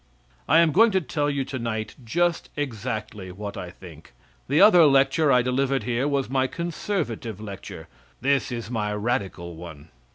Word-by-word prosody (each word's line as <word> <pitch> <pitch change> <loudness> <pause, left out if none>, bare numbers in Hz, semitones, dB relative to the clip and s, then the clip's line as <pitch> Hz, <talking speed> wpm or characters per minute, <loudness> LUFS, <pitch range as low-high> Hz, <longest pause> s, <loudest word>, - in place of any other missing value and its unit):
I 160 +4 +6
am 165 -2 +3
going 225 +8 +5
to 190 - +4
tell 145 -2 -1
you 140 -2 -1
tonight 115 -5 -4
just 170 +8 0
exactly 110 -7 -4
what 100 +2 -7
I 90 -2 -6
think. 85 -6 -14 0.4
The 145 +3 +3
other 195 -5 +8
lecture 140 +2 +3
I 125 -2 +4
delivered 135 +2 0
here 125 +3 0
was 140 -2 0
my 130 0 +1
conservative 155 - -4
lecture; 100 -3 -8 0.3
this 140 +1 +1
is 115 -1 -5
my 105 -3 -1
radical 100 -6 -3
one! 80 -2 -11
125 Hz, 160 wpm, -24 LUFS, 105-145 Hz, 0.4 s, other